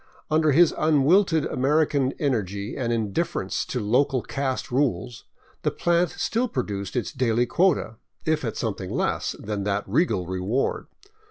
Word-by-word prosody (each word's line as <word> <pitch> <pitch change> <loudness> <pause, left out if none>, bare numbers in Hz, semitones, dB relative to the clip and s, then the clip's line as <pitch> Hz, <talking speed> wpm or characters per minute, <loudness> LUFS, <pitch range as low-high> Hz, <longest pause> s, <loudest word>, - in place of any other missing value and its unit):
Under 155 -1 +3
his 165 +3 +5
unwilted 160 +3 +3
American 140 0 +1
energy 105 - -2
and 120 -3 -2
indifference 110 -4 -1
to - - -3
local 125 +4 +1
caste 135 -2 -3
rules 125 -4 -1 0.4
the - - +1
plant 170 0 +1
still 240 +3 -1
produced 105 - -4
its 125 - -2
daily 120 -3 +1
quota, 165 - +1 0.3
if 155 -1 +1
at 115 -4 -3
something 100 -4 -3
less - - -1
than 105 -1 -4
that 105 0 0
regal 110 - +1
reward. 95 +8 -1
130 Hz, 140 wpm, -25 LUFS, 105-155 Hz, 0.4 s, his